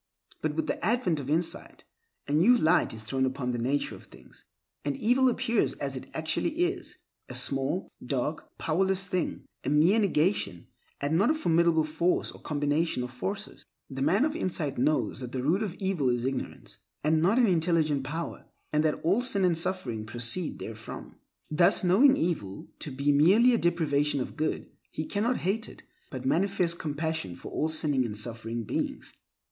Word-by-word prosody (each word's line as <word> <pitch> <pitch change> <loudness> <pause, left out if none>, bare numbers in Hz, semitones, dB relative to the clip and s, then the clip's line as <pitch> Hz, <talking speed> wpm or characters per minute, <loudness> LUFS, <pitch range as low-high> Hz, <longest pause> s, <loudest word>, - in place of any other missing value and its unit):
But 155 -1 -1
with 160 - 0
the - - -3
advent 190 -6 +1
of 140 -1 -6
insight, 165 +3 -2 0.4
a - - -4
new 185 +12 +5
light 160 -6 +3
is 110 -1 -7
thrown 130 +4 -1
upon 130 -1 -1
the 120 - -2
nature 135 +5 0
of - - -11
things, - - -17 0.4
and 145 -1 -2
evil 255 +4 +3
appears 235 -2 +1
as 140 -1 -4
it 130 - -7
actually 160 - -1
is—a 355 +1 -4
small, 135 +6 0 0.2
dark, 135 +4 -3
powerless 190 +4 +1
thing, 185 -2 -2 0.2
a - - -1
mere 160 +9 +4
negation, 160 - +1 0.3
and 150 +4 +1
not 205 - +4
a 315 - +3
formidable 170 - +3
force 160 +4 0
or - - -14
combination 145 -1 0
of 125 - -6
forces. 195 - -5 0.3
The 135 0 -5
man 195 - +3
of 310 0 -2
insight 165 - -2
knows 145 -1 +1
that 125 -2 -6
the 130 -1 -2
root 170 +9 +2
of 200 -5 -3
evil 190 -9 0
is 120 0 0
ignorance—and 150 +3 -3
not 195 +8 +3
an 250 - +6
intelligent 165 -6 +2
power—and 150 0 -4
that 155 -1 +1
all 190 +9 +3
sin 205 -7 +2
and 175 -2 +3
suffering 160 - -3
proceed 120 +9 -3
therefrom. 110 0 -8 0.3
Thus, 175 +6 +4
knowing 250 +10 +5
evil 105 - -2
to - - -3
be 140 +2 +1
merely 195 - +5
a 235 - +2
depravation 150 -4 +1
of 125 - -4
good, 155 - -2 0.2
he 155 - -4
cannot 225 +8 0
hate 215 +4 0
it, - - -14 0.3
but 130 -1 -6
manifests 180 +2 +1
compassion 155 - -3
for - - -10
all 155 - 0
sinning 150 -4 +1
and 105 -3 -4
suffering 115 +1 -4
beings. - - -3
160 Hz, 175 wpm, -28 LUFS, 135-185 Hz, 0.4 s, an